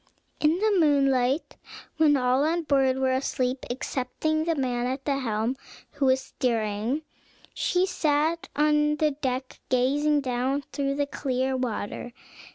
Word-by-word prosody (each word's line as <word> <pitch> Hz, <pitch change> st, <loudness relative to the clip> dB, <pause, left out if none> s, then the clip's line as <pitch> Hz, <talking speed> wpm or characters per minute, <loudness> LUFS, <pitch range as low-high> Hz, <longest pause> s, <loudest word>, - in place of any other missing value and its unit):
In 310 Hz, +3 st, +3 dB
the 415 Hz, -1 st, +2 dB
moonlight, 275 Hz, -2 st, +2 dB, 0.4 s
when 300 Hz, -2 st, +5 dB
all 255 Hz, +1 st, +2 dB
on 335 Hz, +2 st, +1 dB
board 270 Hz, -3 st, +2 dB
were 265 Hz, 0 st, +1 dB
asleep, 260 Hz, -1 st, -1 dB
excepting 275 Hz, +5 st, -2 dB
the 330 Hz, -1 st, +1 dB
man 250 Hz, -3 st, -1 dB
at 265 Hz, +2 st, -4 dB
the 275 Hz, -2 st, 0 dB
helm, 225 Hz, 0 st, -1 dB, 0.4 s
who 275 Hz, -, 0 dB
was 260 Hz, 0 st, +3 dB
steering, 230 Hz, +3 st, -1 dB, 0.5 s
she 360 Hz, 0 st, +1 dB
sat 320 Hz, -2 st, 0 dB
on 300 Hz, 0 st, +3 dB
the 305 Hz, 0 st, +1 dB
deck, 260 Hz, -2 st, -4 dB
gazing 285 Hz, +4 st, +2 dB
down 260 Hz, +2 st, -1 dB
through 275 Hz, -1 st, -1 dB
the 285 Hz, 0 st, 0 dB
clear 265 Hz, -2 st, -1 dB
water. 240 Hz, -1 st, -4 dB
275 Hz, 140 wpm, -26 LUFS, 255-300 Hz, 0.5 s, when